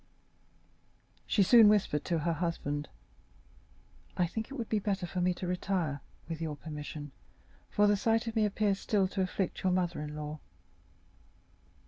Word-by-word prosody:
She 205 - +4
soon 225 +2 +8
whispered 195 -8 +2
to 170 - +1
her 165 +2 0
husband: 150 -3 -2 1.3
"I 180 - +3
think 220 +7 -4
it 275 - -7
would 235 -5 -4
be 215 - +1
better 195 -2 -1
for 180 +1 -3
me 180 +1 +3
to 180 - -5
retire, 180 -5 -1 0.3
with 165 -1 -5
your 155 -2 -2
permission, 150 -1 -7 0.6
for 210 - +3
the 205 0 +5
sight 225 +3 +1
of 230 0 -4
me 220 - +3
appears 205 -1 +1
still 200 -3 +2
to 195 - -2
afflict 185 0 -2
your 185 - +2
mother 175 -3 0
in 150 0 -5
law." 150 0 -5
180 Hz, 160 wpm, -31 LUFS, 155-205 Hz, 1.3 s, soon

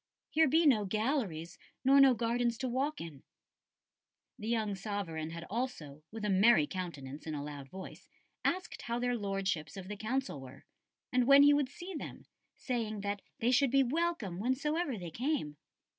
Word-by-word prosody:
Here 320 0 +4
be 320 +5 +4
no 240 -8 +5
galleries 205 - -1 0.3
nor 275 +1 +7
no 265 -2 +7
gardens 235 +1 0
to 260 - -2
walk 275 +5 -1
in.'" 150 -5 -8 1.2
The 215 - -5
young 220 -3 0
sovereign 190 -6 -4
had 165 0 -6
also, 175 - -4
with 220 -1 -5
a - - 0
merry 190 -4 +6
countenance 150 -4 -6
and 155 - -3
a 145 - -3
loud 145 -2 -7
voice, 190 +4 -10 0.3
asked 365 +1 -1
how 235 0 -2
their 245 0 0
Lordships 195 -5 -2
of 190 -1 -7
the 210 - -4
Council 220 - -2
were, 130 -1 -12 0.5
and 250 -1 +3
when 280 +1 +9
he 290 0 +7
would 285 -3 +2
see 355 +6 -8
them, 310 - -7 0.3
saying 225 -5 -3
that 200 0 -2 0.2
they 235 +2 +2
should 270 +1 +4
be 275 +2 +4
welcome 265 - -1
whensoever 280 - 0
they 175 -3 -6
came. 245 - -2
225 Hz, 175 wpm, -33 LUFS, 180-265 Hz, 1.2 s, when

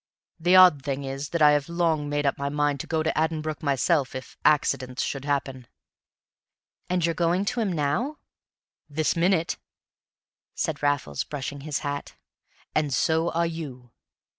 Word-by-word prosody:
The 175 +3 +4
odd 180 -6 +8
thing 140 0 -3
is 135 +1 -5
that 170 -2 +1
I 150 - +8
have 145 +1 +1
long 165 -4 0
made 145 0 -1
up 140 - +2
my 140 0 -3
mind 145 -1 0
to - - -6
go 160 -1 0
to 160 - 0
Addenbrooke 155 -1 -1
myself 140 0 +1
if 130 - -8
accidents 135 -4 +2
should 135 -1 -4
happen." 135 -3 -2 1.2
"And 180 -2 +1
you're 165 - +1
going 175 +3 +1
to 245 +4 -1
him 215 -4 0
now?" 175 - -1 0.7
"This 155 +1 0
minute," 170 0 +1 1.0
said 155 -3 -2
Raffles, 145 - 0
brushing 140 0 -6
his 150 0 -2
hat; 145 0 -4 0.6
"and 150 -2 +1
so 160 +6 +2
are 170 +1 +2
you." 140 -8 -6
150 Hz, 160 wpm, -26 LUFS, 140-165 Hz, 1.2 s, odd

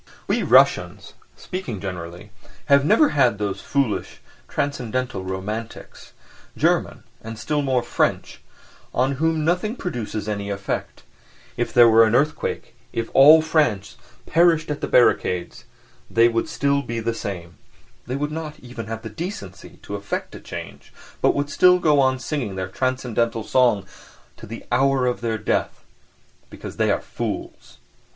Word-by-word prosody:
We - - 0
Russians, - - +3 0.2
speaking 180 - -5
generally, 90 +1 -7 0.3
have 140 -1 +5
never 215 - +4
had 125 -7 +2
those 100 -2 -3
foolish 135 -7 -2 0.3
transcendental 130 -6 -3
"romantics"—German, 100 +5 -4 0.2
and 115 0 -7
still 145 +6 -1
more 130 -3 +1
French—on 125 +2 -3
whom 160 0 0
nothing 180 +7 0
produces 115 - -4
any 100 -1 -3
effect; 100 -1 -4 0.5
if 120 - -2
there 120 -1 +7
were 115 0 +7
an 110 +1 +1
earthquake, 150 +4 -1 0.2
if 115 -1 -4
all 155 +4 +8
France 135 -11 0 0.3
perished 165 -2 +3
at 145 - -4
the - - -2
barricades, 120 -2 +2 0.4
they 115 +1 +5
would 115 +5 -1
still 140 -3 +1
be 115 -4 -4
the 115 +1 -1
same, 85 -7 -7 0.5
they 125 - -3
would 150 +2 -2
not 155 -1 -6
even 120 -3 -8
have 110 0 -6
the - - -5
decency 105 - -7
to - - -8
affect 100 0 -4
a - - -8
change, - - -9 0.3
but - - +3
would 145 +1 -2
still 180 0 +5
go 150 -5 +3
on 130 -1 +3
singing 130 -7 -4
their 95 -1 -3
transcendental 120 -1 -1
songs 110 -6 +2 0.5
to - - -12
the 115 +2 -8
hour 135 +1 +2
of 125 -1 -1
their 115 -1 -1
death, - - -2 0.7
because - - -9
they - - +2
are - - +1
fools. - - -6
120 Hz, 145 wpm, -22 LUFS, 105-145 Hz, 0.7 s, all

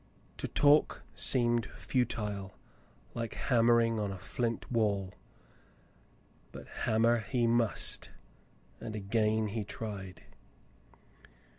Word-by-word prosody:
To - - -3
talk 145 +1 +3
seemed 120 -3 +4
futile, 105 -6 -3 0.6
like 115 -1 -5
hammering 115 -2 +3
upon 105 -2 -2
a 95 - -6
flint 115 +7 -4
wall; 100 -5 0 1.4
but - - -10
hammer 115 +2 +1
he 120 +1 -1
must, 115 -1 +1 0.7
and 110 - -6
again 110 +1 0
he 110 +1 -3
tried. 100 -3 -7
115 Hz, 95 wpm, -31 LUFS, 105-120 Hz, 1.4 s, seemed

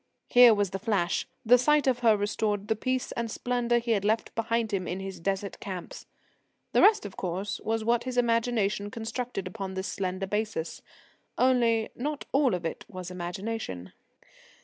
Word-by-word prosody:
Here 245 -2 +8
was 205 -2 0
the 195 - -3
flash. 200 -5 0 0.2
The 245 +2 +7
sight 300 +3 +3
of 255 -2 +2
her 225 -3 +4
restored 205 0 -1
the 220 - +3
peace 255 +3 -2
and 235 -1 -3
splendour 240 +1 0
he 235 0 -1
had 205 -3 +2
left 215 +2 0
behind 230 -1 -1
him 185 -2 -1
in 180 - -3
his 195 -2 -6
Desert 195 +3 -2
camps. 185 -3 -7 0.6
The - - +4
rest, 420 - +5
of 200 - -8
course, 190 +3 -3
was 225 0 -1
what 235 +2 +1
his 255 -1 -4
imagination 230 -4 +1
constructed 225 -1 -4
upon 190 0 -5
this 190 0 -3
slender 185 0 -2
basis. 210 -4 -3 0.6
Only, 235 -3 +3
not 290 +3 -3
all 270 -6 +3
of 175 -1 -5
it 165 - -4
was 185 -1 -7
imagination. 180 - -5
220 Hz, 170 wpm, -28 LUFS, 195-240 Hz, 0.6 s, Here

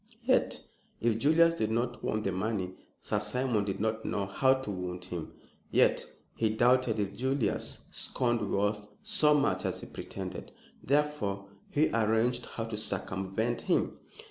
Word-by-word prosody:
Yet - - +2 0.4
if 115 -1 +1
Julius 165 +5 +5
did 110 -10 -1
not 120 +2 -1
want 110 0 -1
the 95 - 0
money, 95 -1 -2 0.3
Sir 105 - -1
Simon 105 0 0
did 95 -2 -3
not 110 +1 -1
know 100 - -1
how 130 +8 +3
to 130 -5 -4
wound 90 -1 -4
him. 85 -3 -5 0.4
Yet - - +3 0.3
he 110 - +1
doubted 120 +1 +3
if 100 -1 -1
Julius 130 +3 -1
scorned 120 -5 0
wealth 105 +1 0 0.2
so 190 -9 +4
much 100 -11 +2
as - - -2
he - - -7
pretended; 95 -2 -7 0.3
therefore 140 -9 0 0.2
he 150 +2 +3
arranged 115 +2 +2
how 115 - -4
to 115 -1 -4
circumvent 95 +3 -2
him. - - 0
110 Hz, 150 wpm, -30 LUFS, 100-125 Hz, 0.4 s, Julius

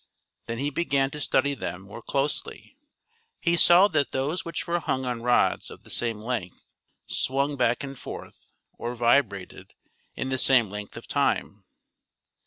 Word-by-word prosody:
Then 115 0 -3
he 140 +4 -1
began 140 -3 +1
to 150 - -6
studj 140 -1 +1
them 90 +2 -4
more 100 +4 -10
closely. 140 - -3 0.6
He 170 0 +2
saw 175 +3 +7
that 145 -6 0
those 150 +6 -1
which 170 - -4
were 170 0 0
hung 130 -5 -1
on 120 -2 -2
rods 120 +1 +2
of - - -12
the - - -7
same 115 -2 0
length 110 -5 -4 0.4
swung 140 +2 0
back 120 0 +1
and 140 -1 -6
forth, - - -10 0.3
or 120 +1 -3
vibrated, 115 -5 +1 0.4
in 130 - -3
the 130 0 0
same 120 -7 +4
length 105 0 -7
of - - -10
time. - - 0
130 Hz, 160 wpm, -26 LUFS, 115-145 Hz, 0.6 s, saw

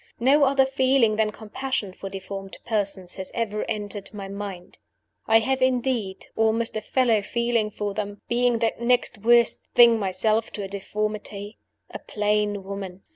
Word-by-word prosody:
No 280 +4 +5
other 270 0 +4
feeling 260 -4 +2
than 220 -1 +2
compassion 220 -2 -4
for 195 - -7
deformed 195 0 -7
persons 200 -5 -1
has 190 -1 -5
ever 215 -2 -1
entered 205 -2 -4
my 200 -1 -6
mind. 195 -2 -7 0.5
I 225 - +6
have, 260 +3 0
indeed, 245 -6 0
almost 225 +1 +1
a 215 - -2
fellow 235 -3 +2
feeling 235 0 0
for 205 -1 -4
them; 205 -1 -4
being 240 0 +2
that 225 0 -1
next 245 -2 +1
worst 235 +2 +4
thing 235 -2 +7
myself 215 +3 0
to 205 - -4
a - - -4
deformity 205 +1 -4 0.3
a - - -6
plain 210 -1 -1
woman. 195 -1 -7
215 Hz, 155 wpm, -24 LUFS, 200-235 Hz, 0.5 s, thing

